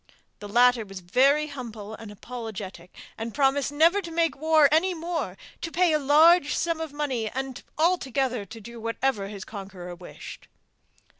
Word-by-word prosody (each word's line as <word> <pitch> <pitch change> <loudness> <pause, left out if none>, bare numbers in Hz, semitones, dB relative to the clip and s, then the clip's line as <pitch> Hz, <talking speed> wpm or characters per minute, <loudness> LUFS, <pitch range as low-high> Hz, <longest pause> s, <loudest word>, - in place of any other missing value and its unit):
The 205 - -8
latter 245 +1 +4
was 195 -2 -9
very 270 +12 +3
humble 230 -7 -8
and 220 -1 -9
apologetic, 205 -5 -8 0.3
and 225 0 -5
promised 280 0 +2
never 330 +7 +4
to 340 - -8
make 330 0 +1
war 310 0 +5
any 350 +4 +3
more, 335 +1 -3 0.2
to 330 - -4
pay 350 -1 +3
a 305 - +3
large 300 +3 +5
sum 335 -1 -1
of 320 -2 -4
money, 265 -7 -2
and 265 +1 -5 0.2
altogether 270 - +1
do 225 +3 -10
whatever 230 -2 -1
his 200 -1 -8
conqueror 190 -4 -8
wished. 175 0 -11
265 Hz, 155 wpm, -26 LUFS, 215-315 Hz, 0.3 s, war